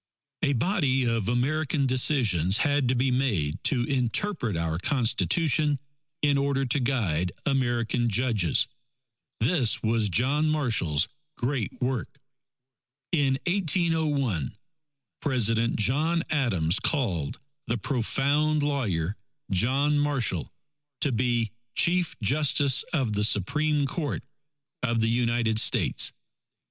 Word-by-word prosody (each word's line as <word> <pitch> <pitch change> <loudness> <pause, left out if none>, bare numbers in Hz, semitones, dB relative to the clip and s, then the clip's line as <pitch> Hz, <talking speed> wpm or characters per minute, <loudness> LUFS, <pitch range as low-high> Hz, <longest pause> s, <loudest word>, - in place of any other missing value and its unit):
A 145 -3 +2
body 135 - +1
of 115 -4 -1
American 140 +4 0
decisions 115 - +2
had 145 -2 +1
to 130 - +2
be 130 +2 +1
made 105 - -1
to 125 -4 +2
interpret 125 - -1
our 80 0 -2
Constitution 145 - +1 0.4
in 145 -1 +3
order 140 -1 0
to 130 +3 0
guide 100 - 0
American 120 -3 0
judges. 110 - +2 0.7
This 125 -1 +2
was 110 -1 +1
John 140 - +1
Marshall's 110 - +1 0.3
great 125 -3 -3
work. 130 +1 -3 0.9
In 140 -5 +2
1801, 155 - 0 0.6
President 115 -4 +1
John 155 +10 +1
Adams 95 - +1
called 95 - 0 0.3
the 115 - 0
profound 140 +6 0
lawyer, 105 - -1 0.4
John 135 +9 +2
Marshall, 130 - 0 0.5
to 145 - +3
be 120 -2 0 0.2
Chief 175 -1 +1
Justice 140 +2 +3
of 135 -10 0
the 105 0 0
Supreme 145 - +1
Court 145 +1 -3 0.6
of 115 -2 0
the 115 0 +1
United 115 -2 +1
States. - - +2
130 Hz, 110 wpm, -26 LUFS, 110-145 Hz, 0.9 s, in